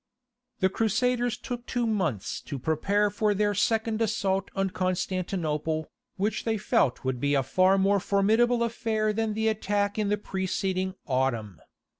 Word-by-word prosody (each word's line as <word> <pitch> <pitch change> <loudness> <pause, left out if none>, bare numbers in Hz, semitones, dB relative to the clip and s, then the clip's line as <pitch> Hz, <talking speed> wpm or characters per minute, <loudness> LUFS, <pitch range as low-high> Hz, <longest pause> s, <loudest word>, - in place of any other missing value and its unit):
The 190 - +4
Crusaders 240 +3 +1
took 245 -1 -6
two 245 -2 0
months 185 - -1
to 140 - -5
prepare 200 +9 +1
for 210 0 +1
their 205 +1 +1
second 220 +2 +1
assault 200 -3 0
on 195 -1 0
Constantinople, 175 -4 -2 0.3
which 205 +2 -1
they 225 -1 0
felt 130 -9 +1
would 130 -1 -1
be 145 +2 +1
a 135 - +2
far 185 +6 +3
more 195 +1 +3
formidable 225 +5 +2
affair 220 -2 0
than 220 0 -1
the 220 +1 0
attack 205 -1 0
in 210 -1 0
the 210 - +2
preceding 190 -1 -2
autumn. 120 - -1
200 Hz, 150 wpm, -27 LUFS, 185-220 Hz, 0.3 s, The